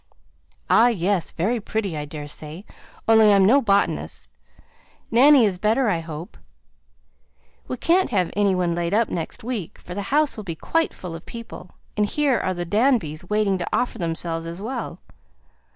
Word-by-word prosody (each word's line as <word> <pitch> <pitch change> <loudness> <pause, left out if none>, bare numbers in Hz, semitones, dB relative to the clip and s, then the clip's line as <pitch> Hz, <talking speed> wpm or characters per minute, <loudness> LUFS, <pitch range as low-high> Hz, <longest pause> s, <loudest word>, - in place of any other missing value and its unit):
"Ah! 230 - +5
yes; 195 -5 0
very 225 +8 -1
pretty 200 -4 -3
I 150 -1 -4
daresay, 150 +3 -8 0.4
only 220 -1 +6
I - - +6
am 195 -1 +5
no 265 +8 +5
botanist. 200 -4 0 0.8
Nanny 260 +1 +6
is 185 -4 -1
better, 220 +3 +2
I 170 - 0
hope? 160 +1 -8 1.3
We 255 - -4
can't 360 +8 +2
have 185 -6 0
any 200 -2 +2
one 175 -2 0
laid 170 +2 -1
up 230 0 +2
next 165 +4 -5
week, 225 -8 -4
for 180 - -9
the 200 - -3
house 295 -1 +2
will 215 - -6
be 170 -4 -5
quite 325 - 0
full 180 -3 -7
of 165 - -10
people, 230 -6 -10 0.2
and 210 0 +1
here 280 0 +1
are 185 - -2
the 175 0 -3
Danbys 185 - +1
waiting 210 -3 +1
to 175 - -3
offer 245 - -1
themselves 165 -1 -3
as 170 +2 -6
well. 225 -5 -5
200 Hz, 170 wpm, -23 LUFS, 170-230 Hz, 1.3 s, only